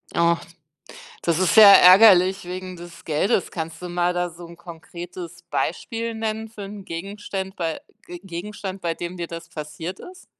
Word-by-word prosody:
Och, 170 0 +3 0.8
das 170 0 0
ist 185 - +2
sehr 205 -3 +10
ärgerlich 190 0 +7
wegen 185 +1 -6
des 170 0 -12
Geldes. 165 +5 0
Kannst 165 0 -6
du 180 - -5
mal 175 0 0
da 175 0 -1
so 170 +1 -12
'n 170 0 -13
konkretes 175 +1 -10
Beispiel 230 -1 -3
nennen 220 0 -4
für 210 -2 -9
'n 200 0 -9
Gegenstand 190 +2 -6
bei 165 -3 -3 0.3
G 175 0 -9
Gegenstand, 195 +1 -7
bei 170 -1 -1
dem 175 +2 -6
dir 170 -2 -5
das 165 0 -8
passiert 160 +3 -7
ist? 365 0 -13
180 Hz, 165 wpm, -23 LUFS, 170-195 Hz, 0.8 s, sehr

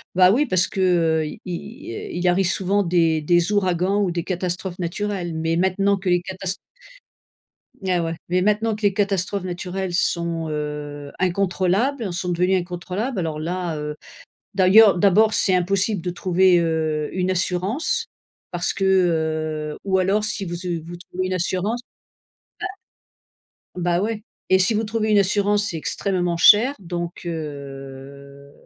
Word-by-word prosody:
bah, 185 0 +6
oui 270 +8 +3
parce 185 -3 +2
qu'i 165 -5 +1
il 175 -1 -5
arrive 180 +1 +3
souvent 195 +3 +1
des 165 -3 +2
des 175 +4 +2
ouragans 190 0 +1
ou 195 - +1
des 170 -1 -2
catastrophes 180 0 -3
naturelles, 180 0 -3
mais 165 +1 0
maintenant 195 +2 +2
que 190 0 -3
les 175 0 +3
catast 190 +1 -4 1.3
Ah 180 -2 +2
ouais, 165 0 -2
mais 180 +1 +1
maintenant 210 +3 +1
que 215 - -11
les 205 -2 +2
catastrophes 200 -1 0
naturelles 180 +1 -4
sont, 170 -2 0
heu, 150 -1 -5
incontrôlables, 195 +6 0
sont 175 +1 -3
devenues 180 +2 +2
incontrôlables, 185 +6 -3
alors 160 -3 -3
là, 170 0 -3
heu, 150 0 -4 0.6
d'ailleurs, 195 +2 +6
d'abord, 210 +3 +4
c'est 190 - +3
impossible 195 +2 +1
de 180 - -3
trouver, 180 0 +3
heu, 160 -2 -1
une 185 0 0
assurance 185 - -1 0.5
parce 175 0 -1
que, 195 - -3
heu, 160 -4 0
ou 190 -1 +1
alors 195 +3 +1
si 210 -2 -2
vous, 175 +1 -5
heu, 170 -2 -1
vous 175 +1 -8
trouvez 180 +1 -5
une 185 - -2
assurance 185 +6 -1 1.9
ah, - - -5
bah 175 0 +1
ouais 215 0 -2 0.3
et 190 - +5
si 185 +4 +3
vous 220 +1 0
trouvez 220 0 -1
une 210 - +4
assurance, 205 +1 +2
c'est 165 - -4
extrêmement 175 +1 -1
cher, 225 +10 +6
donc 175 -2 -5
heu - - -2
heu, 140 -2 -9
180 Hz, 150 wpm, -22 LUFS, 170-195 Hz, 1.9 s, bah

